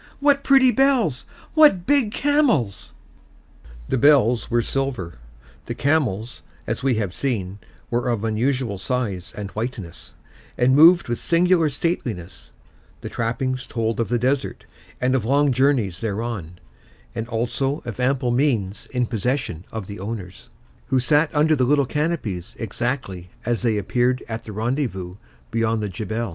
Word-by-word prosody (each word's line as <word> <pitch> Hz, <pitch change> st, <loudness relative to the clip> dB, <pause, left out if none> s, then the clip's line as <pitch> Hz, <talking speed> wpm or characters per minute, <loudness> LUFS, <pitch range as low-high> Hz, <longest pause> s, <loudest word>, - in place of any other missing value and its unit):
What 280 Hz, -1 st, +3 dB
pretty 270 Hz, -2 st, +6 dB
bells! 255 Hz, -, +2 dB, 0.3 s
What 295 Hz, -, +5 dB
big 275 Hz, -5 st, +2 dB
camels!" 260 Hz, -, +1 dB, 1.0 s
The 130 Hz, -, 0 dB
bells 125 Hz, -5 st, +4 dB
were 120 Hz, -1 st, +2 dB
silver; 125 Hz, -, -3 dB, 0.5 s
the 120 Hz, -, -4 dB
camels, 125 Hz, -7 st, 0 dB, 0.2 s
as -, -, -3 dB
we 135 Hz, -2 st, +2 dB
have 100 Hz, -5 st, -2 dB
seen, 100 Hz, -8 st, -2 dB, 0.3 s
were 120 Hz, +1 st, 0 dB
of 115 Hz, -3 st, -1 dB
unusual 115 Hz, -1 st, -1 dB
size 100 Hz, -6 st, -3 dB
and 100 Hz, -1 st, -5 dB
whiteness, 110 Hz, -6 st, -6 dB, 0.4 s
and 130 Hz, +2 st, +4 dB
moved 170 Hz, +4 st, +7 dB
with 120 Hz, -1 st, -2 dB
singular 170 Hz, -1 st, +3 dB
stateliness; 120 Hz, -, -4 dB, 0.5 s
the -, -, -6 dB
trappings 130 Hz, +3 st, -2 dB
told 115 Hz, -2 st, -2 dB
of 115 Hz, -, 0 dB
the 120 Hz, -, +2 dB
desert 130 Hz, +3 st, -1 dB, 0.3 s
and 125 Hz, +1 st, +1 dB
of 130 Hz, -4 st, +1 dB
long 140 Hz, +4 st, +3 dB
journeys 125 Hz, -, +1 dB
thereon, 105 Hz, -5 st, -4 dB, 0.6 s
and 115 Hz, 0 st, -4 dB
also 120 Hz, +5 st, -2 dB
of 120 Hz, -1 st, -6 dB
ample 125 Hz, -1 st, +1 dB
means 120 Hz, -7 st, 0 dB
in 125 Hz, -2 st, -1 dB
possession 115 Hz, -, -2 dB
of 110 Hz, -3 st, -5 dB
the 100 Hz, 0 st, -8 dB
owners, 100 Hz, -3 st, -7 dB, 0.4 s
who 130 Hz, -1 st, +2 dB
sat 150 Hz, +4 st, +3 dB
under 155 Hz, +1 st, +4 dB
the 130 Hz, -, +1 dB
little 140 Hz, +1 st, +3 dB
canopies 145 Hz, -, -3 dB
exactly 110 Hz, -5 st, -3 dB, 0.2 s
as 120 Hz, 0 st, 0 dB
they 115 Hz, -3 st, +1 dB
appeared 125 Hz, +5 st, 0 dB
at 115 Hz, 0 st, -5 dB
the 110 Hz, -, -7 dB
rendezvous 110 Hz, -5 st, -3 dB, 0.3 s
beyond 115 Hz, -1 st, 0 dB
the 105 Hz, -, -2 dB
Jebel. 110 Hz, +4 st, -3 dB
120 Hz, 145 wpm, -22 LUFS, 110-140 Hz, 1.0 s, moved